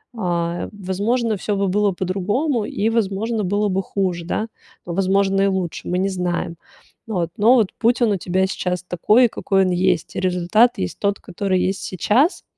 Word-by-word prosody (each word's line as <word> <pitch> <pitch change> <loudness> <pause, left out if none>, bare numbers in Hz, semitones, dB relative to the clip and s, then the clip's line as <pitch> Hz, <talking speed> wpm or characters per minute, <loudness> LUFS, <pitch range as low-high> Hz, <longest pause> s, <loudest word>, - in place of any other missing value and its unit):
а, 175 -4 -2
возможно, 210 +4 -1
всё 205 +2 -2
бы 200 0 0
было 205 +1 +2
по-другому 205 - -1
и, 210 +2 -1
возможно, 220 0 -1
было 205 +3 +1
бы 190 0 0
хуже, 185 -4 -2
да, 215 +5 -2 0.4
но, 170 - -5
возможно, 195 +1 +2
и 200 - +3
лучше, 190 -3 -3
мы 180 - -1
не 190 +2 +1
знаем. 175 -2 -2 0.5
Но 180 -7 -1 0.3
вот 220 -6 +3
путь 235 +2 +2
он 220 - +3
у 200 - +1
тебя 185 +2 0
сейчас 180 -1 -3
такой, 210 +8 +3
какой 195 -2 +1
он 185 - 0
есть. 180 -2 0
Результат 185 +6 +2
есть 90 - -4
тот, 200 0 0
который 185 0 -2
есть 190 +1 -1
сейчас. 225 - +1
195 Hz, 170 wpm, -21 LUFS, 180-210 Hz, 0.5 s, и